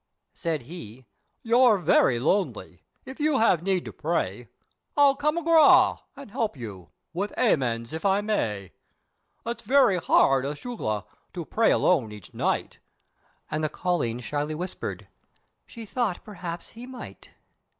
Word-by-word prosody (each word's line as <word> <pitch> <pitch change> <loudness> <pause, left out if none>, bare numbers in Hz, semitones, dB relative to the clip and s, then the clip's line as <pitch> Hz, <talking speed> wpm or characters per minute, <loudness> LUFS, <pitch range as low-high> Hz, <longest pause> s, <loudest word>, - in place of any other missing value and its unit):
Said 160 -6 -3
he 130 -5 -10 0.4
"You're 235 -1 +5
very 135 -8 +3
lonely: 185 +9 -1 0.2
If 265 - -10
you 300 -2 +2
have 220 -8 +3
need 185 -1 0
to - - -8
pray, - - -2 0.5
I'll 285 -1 +6
come 300 +3 0
agrah! 330 -2 +5 0.2
and 275 -6 -11
help 225 - -2
you, 100 -8 -9 0.2
with 200 +4 -2
'Amens' 125 - +1
if 160 - -5
I 195 0 +3
may, 105 - -2 0.7
It's 235 0 -4
very 255 -8 +4
hard 135 -5 +3
acushla! 145 - -4 0.3
to 170 -3 -4
pray 225 +6 +2
alone 135 -12 +2
each 105 -3 -12
night," - - -2 0.7
And 155 +1 -1
the 155 - +1
colleen 150 -9 -1
shyly 150 +4 -3
answered, 180 +1 -5 0.6
"She 230 -2 -9
thought 215 -4 -2
perhaps 175 -4 -7
he 235 +2 -11
might." 255 -1 -10
180 Hz, 140 wpm, -26 LUFS, -, 0.7 s, I'll